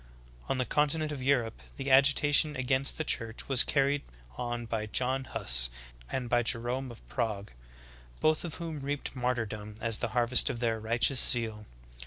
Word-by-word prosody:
4. - - 0
On - - -4
the 130 - -1
continent 150 +2 0
of 140 -3 -6
Europe 125 -4 0 0.2
the 135 0 -3
agitation 145 +2 +5
against 130 +1 -1
the 160 - -2
Church 115 -6 -3
was 135 -3 +8
carried 140 0 +1 0.3
on 120 -1 -4
by 110 -1 -3
John 130 +4 -1
Huss - - +1 0.4
and 130 -2 -3
by 120 0 +2
Jerome 120 +3 -2
of 120 - -14
Prague, 110 -5 -3 0.7
both 155 0 +1
of 170 -4 -6
whom 165 -3 -6
reaped 140 0 -3
martyrdom 110 -4 -3
as 115 -1 +1
the - - -1
harvest 120 +1 +4
of 120 - -4
their 115 -2 -1
righteous 115 +4 +1
zeal. 110 -3 +2
125 Hz, 170 wpm, -29 LUFS, 115-140 Hz, 0.7 s, was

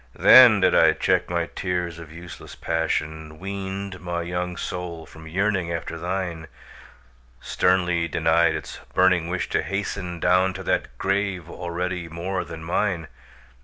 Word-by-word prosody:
Then 120 -6 +8
did - - +4
I - - +6
check - - +1
my 85 -1 0
tears 90 -2 -3
of 80 -2 -11
useless 85 +1 -10
passion, 80 -1 -2
Weaned 95 +1 -5
my 85 -1 -3
young 90 0 -3
soul 85 -2 -5
from 80 0 -13
yearning 95 0 0
after 85 -1 -4
thine, 85 -2 -3 0.9
Sternly 90 -2 +1
denied 80 +1 +2
its - - -7 0.2
burning 90 -2 +4
wish 90 +1 -2
to - - +1
hasten 95 -3 -4
Down 90 +2 +3
to 95 - -6
that 60 -8 -1
grave 95 -2 -1
already 90 0 -4
more 90 +3 -3
than 80 -1 -9
mine! 85 -1 -1
90 Hz, 140 wpm, -24 LUFS, 85-95 Hz, 0.9 s, Then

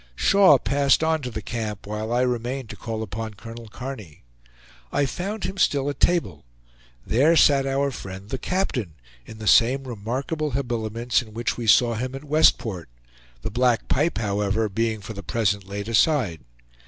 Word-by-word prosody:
Shaw 195 - +6
passed 140 +3 +2
on 160 -1 +1
to 125 - -4
the 110 -3 -6
camp, 110 -1 -4
while 105 +2 -4
I 120 +1 +2
remained 125 0 -2
to - - -8
call 110 +2 -5
upon 110 +1 -6
Colonel 115 +2 -10
Kearny. 115 - -8 0.7
I 145 - +1
found 195 - -4
him 190 +2 -4
still 140 -5 +2
at - - -11
table. 175 -1 +1 0.6
There 145 +9 +3
sat 140 -3 +5
our 140 +1 0
friend 95 -3 -8
the 130 - -2
captain, 130 - -2 0.3
in 110 - -10
the 110 - -8
same 125 +6 +4
remarkable 130 +7 -3
habiliments 120 -2 -1
in 110 -2 -13
which 120 0 -1
we 120 -2 -5
saw 120 +2 +5
him 125 +4 -4
at 135 - -8
Westport; 120 - +2 0.5
the - - -3
black 120 0 +1
pipe, 150 +6 +1
however, 105 0 0
being 110 +1 -1
for 110 +3 -7
the 100 - -7
present 100 -3 -1
laid 100 +1 -5
aside. 115 - +2
120 Hz, 170 wpm, -24 LUFS, 110-140 Hz, 0.7 s, Shaw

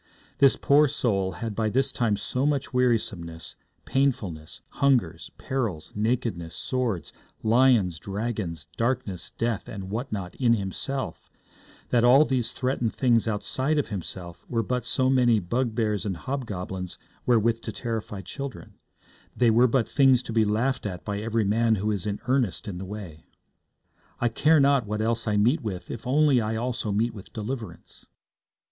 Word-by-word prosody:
This 140 -2 +6
poor 145 +2 +4
soul 100 - 0
had 110 +6 -4
by 110 0 0
this 135 +5 +1
time 110 -4 +1
so 125 +5 -2
much 145 -2 0
wearisomeness, 90 -10 -1 0.3
painfulness, 105 - -1
hunger, 130 - +2 0.2
perils, 115 -12 -3
nakedness, 105 -7 -1
sword, 120 - -2 0.3
lions, 110 -7 +4
dragons, 100 -6 -4
darkness, 115 -7 -1
death, 115 -3 -1
and 95 -2 -7
what 120 +5 -3
not 95 -4 -4
in 120 -3 +4
himself, 115 +7 -4 0.6
that 120 -2 +3
all 130 +5 +7
these 130 -5 0
threatened 125 -3 -1
things 120 -4 +3
outside 130 +8 0
of 145 - 0
himself 90 -3 -6
were 115 -2 0
but 125 +1 -2
so 130 +2 +2
many 125 -3 +4
bugbears 110 +1 -1
and 95 -4 -3
hobgoblins 95 -8 -5 0.3
wherewith 115 -1 +3
to - - -5
terrify 110 -4 -4
children; 95 -1 -7 0.6
they 120 -2 +4
were 120 +3 +5
but 120 -1 +1
things 135 -3 +4
to 115 - -6
be 110 -1 +4
laughed 110 +4 0
at 90 -3 -7
by 100 -1 -2
every 110 0 0
man 110 +2 +3
who 105 +2 -1
is 100 -2 -2
in 100 -1 -2
ernest 125 -8 0
in 90 -3 -5
the 95 - -5
way. 95 -6 -8 1.0
'I 120 - +2
care 155 +7 +4
not 140 -4 +3
what 105 +1 -2
else 115 +1 0
I 105 -1 +2
meet 125 +10 +3
with 95 -6 -5
if 115 - -7
only 140 -1 +4
I 110 +1 -2
also 120 -1 -2
meet 115 +4 +1
with 100 -4 -11
deliverance.' 115 +1 -7
115 Hz, 160 wpm, -26 LUFS, 100-125 Hz, 1.0 s, all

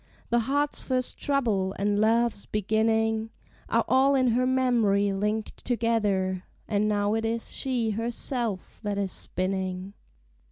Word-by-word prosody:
The 240 - +4
heart's 285 +5 0
first 255 -1 -2
trouble, 220 -9 0
and 205 +1 +1
love's 225 -1 +2
beginning, 220 +1 +1 0.4
Are 230 0 +2
all 270 +2 +4
in 255 -2 +3
her 250 +2 +2
memory 230 -6 +2
linked 210 +2 -2
together; 205 -6 0 0.2
And 210 0 +1
now 205 0 +1
it 225 0 0
is 225 +1 -2
she 245 -5 -1
herself 230 -2 -2
that 205 -2 -2
is 195 -2 -1
spinning. 185 0 -3
220 Hz, 130 wpm, -27 LUFS, 200-240 Hz, 0.4 s, The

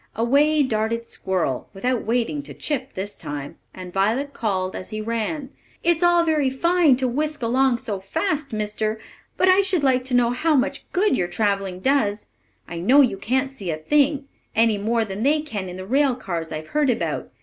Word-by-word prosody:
Away 285 +7 +3
darted 230 -1 -1
squirrel, 185 - -2
without 245 +4 -1
waiting 245 +5 0
to 285 - -11
chip 270 -3 -3
this 200 +2 -4
time, 145 -2 -7
and 180 -1 -9
Violet 230 +9 0
called, 190 -4 -2
as - - -6
he 215 - -5
ran, 230 +6 -3 0.3
"It's 340 0 +2
all 345 -1 +5
very 305 -4 +2
fine 335 +1 +3
to 260 0 0
whisk 300 +2 -2
along 255 +2 +2
so 205 -4 -4
fast, 305 - -2
mister; 215 0 -2 0.4
but 370 - +3
I 375 +1 +6
should 375 -5 0
like 255 -2 +3
to 255 -1 0
know 240 -1 +3
how 305 +6 +1
much 275 +1 -1
good 380 -5 +2
your 180 -7 0
travelling 195 -2 -1
does. 215 -5 +1 0.4
I 170 - -6
know 255 +12 +5
you 250 -7 +2
can't 260 +6 0
see 200 -9 -7
a 155 - -1
thing, 285 - +1 0.3
any 225 -2 +3
more 225 +2 +1
than 195 0 -6
they 290 +5 +3
can 210 -11 -5
in 180 - -7
the 185 - -7
rail 270 +4 +2
cars 170 -9 -5
I've 155 0 -6
heard 295 -2 +2
about. 240 - -1
245 Hz, 195 wpm, -23 LUFS, 205-285 Hz, 0.4 s, I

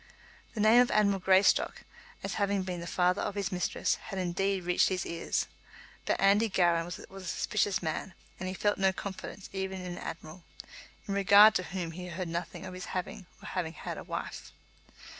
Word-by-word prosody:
The - - -4
name 220 +3 +7
of 245 - +2
Admiral 200 -2 +3
Greystock, 190 +1 +3 0.4
as - - -3
having 200 -1 +1
been 180 -1 -4
the 170 - -6
father 180 +1 +2
of 205 - -3
his 200 -1 -2
mistress, 180 -1 0
had 195 -3 -5
indeed 190 +1 0
reached 175 0 +3
his 185 -1 -2
ears; 170 0 -1 0.6
but - - +1
Andy 205 +3 +4
Gowran 170 -3 +2
was 175 +1 -6
a 195 0 -11
suspicious 195 +2 0
man, 165 +3 -3 0.2
and 185 0 -4
felt 205 -1 +1
no 190 0 +4
confidence 190 0 -7
even 190 0 -3
in 180 -1 -6
an 175 - -6
admiral, 165 +2 -8 0.6
in 200 - -2
regard 200 +2 +7
to 185 - 0
whom 175 -3 -4
he 180 +2 -7
heard 175 0 -4
nothing 170 +2 -5
of 185 - -7
his 185 0 -6
having, 185 +1 -5 0.2
or - - -7
having 170 -3 -3
had, - - -6
a - - -8
wife. - - -6
185 Hz, 190 wpm, -30 LUFS, 180-200 Hz, 0.6 s, name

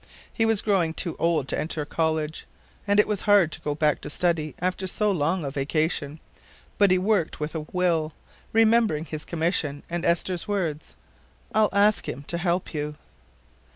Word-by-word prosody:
He 225 -2 +1
was 220 -2 +2
growing 180 -6 +1 0.2
old 165 -5 +1
to - - 0
enter 155 0 -3
college, 160 0 -2 0.4
and 200 +1 +3
it 210 - +5
was 210 -3 -1
hard 195 -6 +6
to - - -6
go 145 -1 -2
back 150 0 +1
to - - -7
study 160 -1 0
after 185 +1 -2
so 210 +3 +1
long 165 -1 0
a 135 - -3
vacation, 150 +1 -1 0.6
but 200 -1 +6
he 185 - +4
worked 190 -3 0
with 150 0 -3
a 155 -2 -5
will, 165 -4 +1 0.4
remembering 225 -8 +3
his 155 -2 -6
commission 160 -4 -1
and 175 0 -2
Esther's 170 +1 0
words: 170 -7 -3 0.6
I'll 215 -1 +4
ask 205 +1 +3
Him 140 - -6
to 170 - -2
help 175 0 -1
you." 150 -1 -3
170 Hz, 170 wpm, -25 LUFS, 155-195 Hz, 0.6 s, hard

